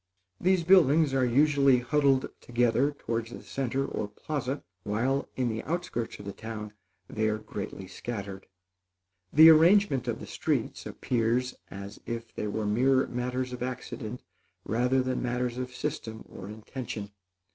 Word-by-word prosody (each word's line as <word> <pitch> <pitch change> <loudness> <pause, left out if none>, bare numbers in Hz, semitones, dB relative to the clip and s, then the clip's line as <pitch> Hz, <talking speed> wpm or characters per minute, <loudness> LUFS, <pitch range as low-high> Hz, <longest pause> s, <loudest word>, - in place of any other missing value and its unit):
These 185 -1 +3
buildings 160 -5 +5
are 135 -1 +2
usually 140 +1 +4
huddled 135 +1 +2
together 120 +3 +2
towards 115 -5 -3
the 120 - -9
centre 135 0 -2
or 105 - -3
plaza, 135 +5 -4 0.2
while, 120 +8 0
in 130 -2 0
the 110 -1 -2
outskirts 165 -8 -3
of 100 - -11
the 100 - -5
town, 110 -2 -7 0.3
they 110 0 0
are 110 - 0
greatly 100 -2 -6
scattered. 100 0 -6 0.8
The 160 +2 +9
arrangement 160 -3 +5
of - - -1
the - - -7
streets - - -2
appears 120 +1 0 0.2
as 100 +1 -8
if 115 -1 -5
they 105 - -3
were 105 +1 -2
mere 130 +5 +3
matters 125 +1 -3
of 125 - -7
accident 125 -2 -5 0.4
rather 125 +4 +2
than 130 0 -1
matters 125 0 -1
of 125 0 -4
system 110 -1 -4
or 95 - -9
intention. 110 -1 -6
125 Hz, 145 wpm, -29 LUFS, 110-135 Hz, 0.8 s, The